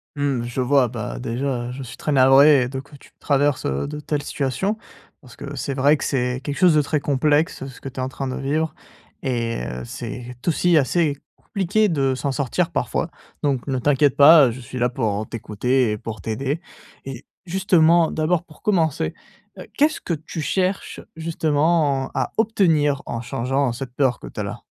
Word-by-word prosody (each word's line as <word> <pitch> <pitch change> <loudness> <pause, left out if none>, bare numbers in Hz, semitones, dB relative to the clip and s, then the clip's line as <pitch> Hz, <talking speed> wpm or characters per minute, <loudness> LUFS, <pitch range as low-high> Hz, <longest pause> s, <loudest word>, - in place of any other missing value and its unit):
Mmh, 140 -4 -1
je 120 +2 -3
vois, 130 0 +3
bah 105 - -5
déjà, 120 - -2
heu, - - -5
je 135 +1 -7
suis 125 - -10
très 150 - -2
navré 135 0 +6
de 135 0 -4
que 145 +2 -13
tu 140 - -18
traverses, 140 -2 +1
heu, 70 - -2
de 150 0 -6
telles 150 -1 -2
situations. 190 - -2 0.4
Parce 125 -4 -15
que 140 0 -8
c'est 140 +1 -3
vrai 140 +3 +4
que - - -6
c'est 125 -1 -1
quelque 145 -1 -4
chose 180 -3 +5
de 150 - +5
très 145 +1 -1
complexe 145 +1 +1
ce 130 - -12
que 135 - -6
tu 130 - -9
es - - -1
en 130 - -2
train 135 +1 -5
de 130 - -3
vivre 155 +4 -1 0.5
et 115 - -2
heu, 60 0 -5
c'est 125 - -7
aussi 170 0 +3
assez 145 +1 +1 0.2
compliqué 205 +2 0
de 135 -5 +1
s'en 140 +1 -2
sortir 135 -2 -1
parfois. - - -1 0.3
Donc 135 -4 0
ne 130 -1 0
t'inquiète 145 +1 +3
pas 145 -3 +8
je 125 - -8
suis 130 +1 -8
là 125 0 +2
pour, 110 -5 -1
heu, - - -5
t'écouter 115 +2 0
et 105 - -2
pour 110 +1 -7
t'aider. 135 +9 -3 0.4
Et 135 -1 -8 0.2
justement, 170 -3 +3
d'abord, 160 +2 0
pour 155 -3 -19
commencer, 160 - +1 0.5
heu, - - -9
qu'est-ce 300 +2 +2
que 175 - -2
tu 160 +1 -5
cherches, 185 +5 -1 0.2
justement, 155 -3 +1
à - - -1
obtenir 160 -10 +2
en 115 0 -4
changeant 130 +2 -1
cette 125 0 -7
peur 130 -4 +1
que - - -9
tu - - -9
as - - -1
là? - - -6
140 Hz, 195 wpm, -22 LUFS, 125-155 Hz, 0.5 s, pas